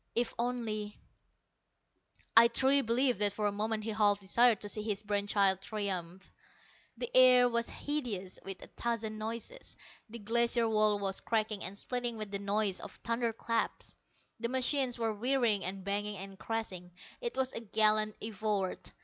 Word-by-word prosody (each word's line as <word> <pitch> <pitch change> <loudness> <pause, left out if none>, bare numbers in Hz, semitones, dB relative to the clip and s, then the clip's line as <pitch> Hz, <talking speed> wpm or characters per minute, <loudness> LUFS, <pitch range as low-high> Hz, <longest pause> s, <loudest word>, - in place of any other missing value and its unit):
"If 240 0 0
only 225 -4 -3 0.7
" - - -37
I 230 +1 +9
truly 265 +4 +3
believe 245 -1 +1
that 205 -1 +2
for 210 0 -2
a 205 - +2
moment 215 +1 -2
he 220 - -2
half 205 -1 +3
desired 225 +3 +3
to 205 - -3
see 215 - -2
his 210 -1 -2
brain 205 -1 -1
child 195 -2 +2
triumph. 190 -3 -4 0.7
The 485 0 -5
air 250 -1 +8
was 235 -1 -1
hideous 235 -11 -4
with 195 -1 -7
a - - -10
thousand 225 -2 -2
noises. 230 - -6 0.3
The 230 - -8
Glacier 235 +2 +1
wall 215 -1 +3
was 195 -1 -2
cracking 215 -2 -1
and 195 +2 -4
splitting 245 0 -2
with 215 -2 -5
the 200 - -2
noise 200 -1 0
of - - -9
thunderclaps; 230 -1 -2 0.4
the 235 +1 -2
machines 260 0 +2
were 225 -2 -1
whirring 235 -2 +1
and 190 +1 -4
banging 205 +1 -2
and 195 0 -8
crashing. 185 -6 -4 0.3
It 475 -2 -4
was 260 0 0
a - - -2
gallant 215 -1 +3
effort! 210 -3 -2
215 Hz, 165 wpm, -32 LUFS, 205-235 Hz, 0.7 s, I